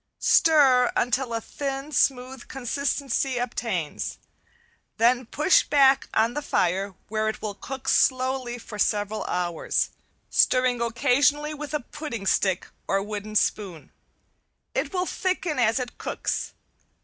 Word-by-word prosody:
Stir 270 -6 +5
until 245 +1 0
a 230 - -1
thin, 275 +4 -5
smooth 260 -3 0
consistency 270 0 -1
obtains, 230 -9 -3 0.8
then 240 +1 +3
push 305 +9 +4
back 275 -2 +3
on 225 +2 +3
the 295 - -3
fire 190 -6 0
where 215 0 -1
it 220 - -5
will 210 -1 -4
cook 265 +5 -8
slowly 255 -2 +1
for 215 -3 -10
several 210 +1 0
hours, 175 -2 -1 0.4
stirring 255 -1 +3
occasionally 280 +6 +2
with 300 0 -5
a 300 - -1
"pudding 245 -6 -7
stick" 190 -1 +1 0.2
or 195 0 +1
wooden 210 0 -6
spoon. 195 -6 -1 0.8
It - - -1
will 365 -1 -1
thicken 365 -6 -2
as 230 0 +3
it 250 -2 -5
cooks. - - -3
245 Hz, 125 wpm, -25 LUFS, 215-275 Hz, 0.8 s, Stir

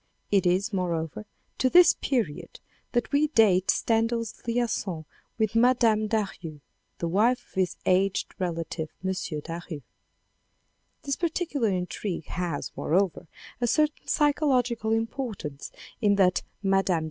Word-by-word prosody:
It 195 -3 +3
is, 185 +4 +1
moreover, 175 +1 -2 0.3
to 255 - +3
this 355 +4 +7
period 230 - -2 0.3
that 240 -3 0
we 295 +1 +3
date 205 -9 +3
Stendhal's 230 0 0
liaison 225 -8 -1 0.3
with 220 -2 0
Mme. 230 -2 +3
Daru 195 -8 -3 0.4
the 170 - -2
wife 230 +8 +2
of - - -26
his 185 -1 0
aged 190 +1 +1
relative, 165 -3 -3 0.2
M. 190 - +1 0.3
Daru. 165 -2 -6 1.2
This 280 -1 -1
particular 320 -8 -1
intrigue 180 -1 -3
has, 175 -4 -3
moreover, 180 0 0 0.3
a 240 - +2
certain 305 +4 +1
psychological 260 -7 +2
importance 225 - -3 0.3
in 205 -2 +4
that 185 -2 +3 0.2
Mme. 195 -3 +2
205 Hz, 120 wpm, -27 LUFS, 180-240 Hz, 1.2 s, this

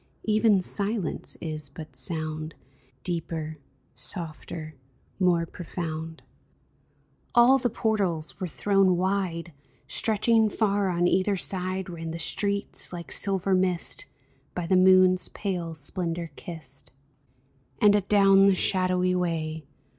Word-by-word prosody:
Even 215 -2 +3
silence 200 -1 -2
is 155 -3 -4
but 155 +1 -10
sound. 155 -2 0 0.5
Deeper, 160 -3 -4 0.4
softer, 160 -2 -4 0.5
more 175 -3 +3
profound! 160 -2 -6 1.1
All 245 +3 +6
the 245 -1 0
portals 195 -9 -1
were 185 - -2
thrown 195 +1 +2
wide! 180 -3 -1 0.3
Stretching 220 0 +2
far 205 -2 +1
on 175 -1 +1
either 190 +2 +2
side 185 +1 -2
Ran 165 -2 -6
the 165 - -4
streets, 200 +4 -1
like 170 -1 -8
silver 195 -1 +1
mist, 185 -2 0 0.5
By 180 - -2
the 185 - +2
moon's 185 0 +5
pale 175 -5 -4
splendor 170 +2 -3
kissed; 155 -7 -8 0.9
And 210 -1 +6
adown 195 -1 +5
the 195 - +4
shadowy 185 -1 +2
way. 160 -4 -2
180 Hz, 110 wpm, -26 LUFS, 165-195 Hz, 1.1 s, All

